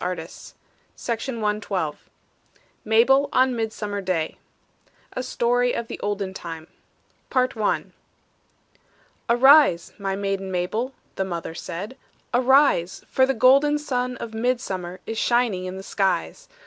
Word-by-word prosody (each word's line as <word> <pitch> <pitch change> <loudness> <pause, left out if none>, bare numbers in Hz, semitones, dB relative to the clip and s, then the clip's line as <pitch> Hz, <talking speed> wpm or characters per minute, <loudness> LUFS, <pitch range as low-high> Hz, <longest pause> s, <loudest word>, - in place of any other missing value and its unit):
UNKNOWN 210 +5 -5 1.2
MABEL 265 +6 +4
ON 255 -1 +3
MIDSUMMER 215 -3 -3
DAY 180 -4 -1 0.8
A - - -2
STORY 245 0 +1
OF 235 - -3
THE - - -7
OLDEN 200 -2 -2
TIME 165 -3 -7 0.6
PART 255 -1 +1
I 215 -2 0 1.5
"Arise, 255 - +5
my 195 -1 -2
maiden, 195 -1 -2
Mabel," 215 +9 -2 0.2
The 190 - +1
mother 170 -3 -5
said; 195 +8 -6 0.4
"arise, 255 - +3
For 260 0 +4
the 270 - 0
golden 275 +5 +5
sun 250 -4 -2
of 225 - -7
midsummer 220 -7 -2
Is 225 0 -3
shining 235 -7 +1
in 185 +1 -5
the 190 - -8
skies. 200 - -1
220 Hz, 115 wpm, -24 LUFS, 190-255 Hz, 1.5 s, Arise